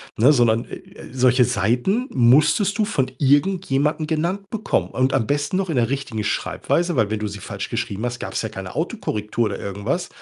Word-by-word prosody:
ne, 125 Hz, +7 st, +5 dB
sondern, 120 Hz, -4 st, +3 dB
äh, -, -, -8 dB
äh, -, -, -13 dB
solche 125 Hz, 0 st, +4 dB
Seiten 125 Hz, -, +1 dB
musstest 150 Hz, -, +4 dB
du 215 Hz, -, +2 dB
von 135 Hz, -, -1 dB
irgendjemandem 150 Hz, 0 st, +1 dB
genannt 175 Hz, +6 st, -2 dB
bekommen 215 Hz, -2 st, -1 dB
und 130 Hz, +1 st, +1 dB
am 120 Hz, -5 st, +1 dB
besten 145 Hz, +5 st, 0 dB
noch 190 Hz, -1 st, -1 dB
in 160 Hz, -, -1 dB
der 120 Hz, -2 st, +2 dB
richtigen 135 Hz, -6 st, -3 dB
Schreibweise, 170 Hz, -, -1 dB
weil 110 Hz, -5 st, +2 dB
wenn 110 Hz, -, -2 dB
du 105 Hz, -, -2 dB
sie 100 Hz, 0 st, -7 dB
falsch -, -, -6 dB
geschrieben 100 Hz, +4 st, -3 dB
hast, 120 Hz, 0 st, -4 dB
gab's -, -, -3 dB
ja -, -, -2 dB
keine -, -, -8 dB
Autokorrektur 105 Hz, +2 st, -2 dB
oder 100 Hz, -, -5 dB
irgendwas, 100 Hz, -, -3 dB
130 Hz, 195 wpm, -22 LUFS, 115-165 Hz, -, ne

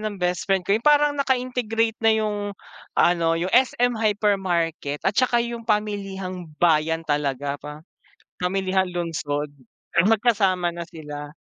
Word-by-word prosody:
ng 215 Hz, -1 st, -4 dB
best 180 Hz, 0 st, -2 dB
friend 190 Hz, -2 st, +2 dB
ko. 195 Hz, -, +1 dB
Yung 220 Hz, +3 st, +1 dB
parang 295 Hz, 0 st, +5 dB
naka-integrate 245 Hz, -4 st, 0 dB
na 225 Hz, 0 st, +4 dB
yung 215 Hz, -1 st, -1 dB, 0.6 s
ano, 170 Hz, -1 st, +3 dB
yung 175 Hz, +3 st, -2 dB
SM 245 Hz, -1 st, +3 dB
Hypermarket 190 Hz, -9 st, 0 dB
at 195 Hz, -, +2 dB
saka 240 Hz, 0 st, +2 dB
yung 235 Hz, -1 st, -7 dB
pamilihang 195 Hz, -4 st, -2 dB
bayan 160 Hz, 0 st, +2 dB
talaga 145 Hz, -2 st, -2 dB
pa 150 Hz, +1 st, -9 dB, 0.3 s
pa -, -, -14 dB
pamilihang 190 Hz, 0 st, 0 dB
lungsod. 150 Hz, -4 st, -3 dB, 0.5 s
Magkasama 195 Hz, -5 st, +2 dB
na 170 Hz, -, -4 dB
sila. 150 Hz, -3 st, -9 dB
190 Hz, 135 wpm, -23 LUFS, 165-220 Hz, 0.6 s, parang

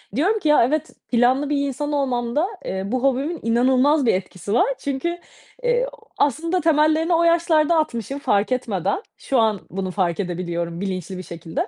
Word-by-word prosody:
diyorum 385 Hz, -, +2 dB
ki, 320 Hz, -, -2 dB
ya, 300 Hz, -, +6 dB
evet 310 Hz, +4 st, -1 dB, 0.2 s
planlı 255 Hz, +4 st, +3 dB
bir 280 Hz, -1 st, 0 dB
insan 290 Hz, +2 st, -3 dB
olmamda, 270 Hz, +2 st, 0 dB, 0.2 s
eee, 190 Hz, 0 st, -3 dB
bu 250 Hz, +5 st, -2 dB
hobimin 275 Hz, +5 st, 0 dB
inanılmaz 260 Hz, +5 st, +3 dB
bir 230 Hz, -, +4 dB
etkisi 185 Hz, +1 st, -4 dB
var 240 Hz, -, +4 dB
çünkü, 285 Hz, +6 st, -2 dB, 0.5 s
eee, -, -, +2 dB
ooo, -, -, -19 dB
aslında 330 Hz, +6 st, +1 dB
temellerini 315 Hz, +2 st, +3 dB
o 335 Hz, 0 st, +3 dB
yaşlarda 335 Hz, -1 st, +3 dB
atmışım 275 Hz, -3 st, -2 dB
fark 215 Hz, -5 st, +1 dB
etmeden. 205 Hz, -, -1 dB, 0.2 s
Şu 265 Hz, -, 0 dB
an 220 Hz, -3 st, +2 dB
bunu 190 Hz, 0 st, -3 dB
fark 175 Hz, -3 st, -1 dB
edebiliyorum 170 Hz, -2 st, -3 dB
bilinçli 190 Hz, -1 st, -4 dB
bir 185 Hz, -, -6 dB
şekilde. 170 Hz, -, -4 dB
265 Hz, 170 wpm, -22 LUFS, 200-310 Hz, 0.5 s, ya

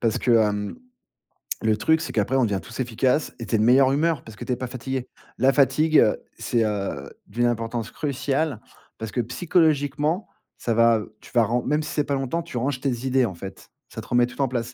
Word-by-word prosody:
parce 115 Hz, -2 st, +1 dB
que, 120 Hz, -, +2 dB
hem, 105 Hz, -, +2 dB, 0.9 s
le 110 Hz, -1 st, +2 dB
truc, 160 Hz, +8 st, +2 dB
c'est -, -, -5 dB
qu'après, 115 Hz, +5 st, +1 dB
on 130 Hz, -, +4 dB
devient 100 Hz, -3 st, -1 dB
tous 115 Hz, +2 st, -11 dB
efficaces 125 Hz, +4 st, 0 dB
et 115 Hz, -, -5 dB
tu 115 Hz, -, -1 dB
es -, -, +4 dB
de 105 Hz, -, +2 dB
meilleure 130 Hz, +3 st, +5 dB
humeur, 160 Hz, +2 st, +1 dB
parce 110 Hz, -2 st, -12 dB
que -, -, -8 dB
tu 125 Hz, -, 0 dB
es -, -, 0 dB
pas 125 Hz, +1 st, -5 dB
fatigué. 130 Hz, +1 st, -4 dB, 0.3 s
La 135 Hz, +1 st, +4 dB
fatigue, 145 Hz, +4 st, +4 dB, 0.3 s
c'est, 115 Hz, -2 st, 0 dB
heu, 100 Hz, -10 st, -3 dB, 0.2 s
d'une 120 Hz, +3 st, 0 dB
importance 115 Hz, -1 st, -2 dB
cruciale, 140 Hz, -2 st, -1 dB, 0.4 s
parce 110 Hz, -1 st, -6 dB
que 120 Hz, -, 0 dB
psychologiquement, 155 Hz, -, +1 dB, 0.3 s
ça 115 Hz, -, -1 dB
va 115 Hz, -1 st, +4 dB, 0.2 s
tu -, -, -15 dB
vas, 120 Hz, -2 st, +5 dB
ren 120 Hz, +3 st, 0 dB
même 150 Hz, +2 st, +1 dB
si -, -, -6 dB
c'est 150 Hz, -, +1 dB
pas 140 Hz, -, -2 dB
longtemps, 135 Hz, +5 st, -1 dB
tu 165 Hz, -7 st, -7 dB
ranges 130 Hz, +2 st, -1 dB
tes 130 Hz, -2 st, -2 dB
idées 130 Hz, -1 st, +3 dB
en 95 Hz, -, -4 dB
fait, 95 Hz, +3 st, -10 dB, 0.2 s
ça -, -, -8 dB
te -, -, -14 dB
remet 120 Hz, 0 st, +3 dB
tout 130 Hz, -, -6 dB
en 135 Hz, -, +3 dB
place. 120 Hz, -1 st, -3 dB
125 Hz, 225 wpm, -24 LUFS, 115-140 Hz, 0.9 s, meilleure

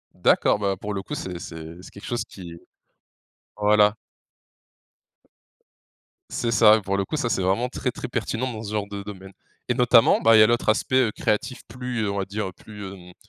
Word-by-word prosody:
D'accord, -, -, +3 dB
bah, 100 Hz, -2 st, 0 dB
pour 105 Hz, +1 st, -4 dB
le 100 Hz, -, -3 dB
coup, -, -, -8 dB
c'est 90 Hz, -2 st, -5 dB
c'est 80 Hz, -1 st, -9 dB
c'est -, -, -13 dB
quelque 100 Hz, -, -12 dB
chose 120 Hz, -2 st, -2 dB
qui 90 Hz, -6 st, -11 dB, 1.0 s
voilà. 105 Hz, 0 st, +4 dB, 2.4 s
C'est 115 Hz, -, -1 dB
ça, 110 Hz, -2 st, +7 dB
et -, -, -5 dB
pour 100 Hz, 0 st, -2 dB
le 100 Hz, 0 st, 0 dB
coup, -, -, -4 dB
ça, 140 Hz, -5 st, -1 dB
c'est, 110 Hz, -, 0 dB
vraiment 95 Hz, +7 st, 0 dB
très -, -, -3 dB
très -, -, -6 dB
pertinent 125 Hz, +3 st, -2 dB
dans 110 Hz, -, -7 dB
ce 105 Hz, -, -6 dB
genre 105 Hz, -1 st, -2 dB
de 100 Hz, 0 st, -6 dB
domaine. 95 Hz, -1 st, -10 dB, 0.4 s
Et 125 Hz, -, +1 dB
notamment, 120 Hz, -2 st, +4 dB
bah, 115 Hz, 0 st, +6 dB
il -, -, +7 dB
y -, -, +9 dB
a -, -, +5 dB
l'autre 120 Hz, -1 st, +1 dB
aspect, 130 Hz, +4 st, +2 dB
heu, 105 Hz, -, -3 dB
créatif 115 Hz, +5 st, -2 dB
plus, 125 Hz, 0 st, -4 dB
heu, 100 Hz, -, -1 dB
on 100 Hz, -, -4 dB
va 95 Hz, -, -2 dB
dire 100 Hz, 0 st, -4 dB
plus, 105 Hz, +2 st, -11 dB
hem, 90 Hz, -2 st, -13 dB
105 Hz, 210 wpm, -24 LUFS, 100-115 Hz, 2.4 s, y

